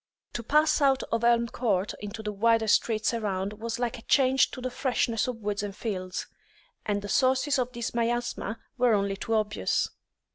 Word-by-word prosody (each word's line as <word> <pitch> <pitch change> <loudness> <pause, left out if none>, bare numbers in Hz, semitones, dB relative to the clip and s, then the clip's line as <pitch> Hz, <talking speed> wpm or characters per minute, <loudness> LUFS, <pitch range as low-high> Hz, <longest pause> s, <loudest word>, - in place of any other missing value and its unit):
To 240 - -3
pass 300 +6 +3
out 270 -1 +3
of 230 0 0
Elm 235 0 +4
Court 205 -6 0
into 210 +2 -7
the 210 - -2
wider 225 +2 +2
streets 215 +1 +2
around 200 -3 -2
was 230 0 -3
like 245 0 -2
a - - -13
change 265 +1 +3
to - - -8
the 255 0 -3
freshness 245 -3 0
of 250 -2 -3
woods 205 0 -1
and 205 -2 -5
fields. 185 -5 -4 0.6
And 205 -1 -1
the - - -5
sources 260 +5 +2
of 250 0 -1
this 235 -2 -4
miasma 235 -2 -1 0.2
were 245 -3 +4
only 200 -1 0
too 225 +3 -2
obvious. 210 -1 0
230 Hz, 185 wpm, -27 LUFS, 210-250 Hz, 0.6 s, Elm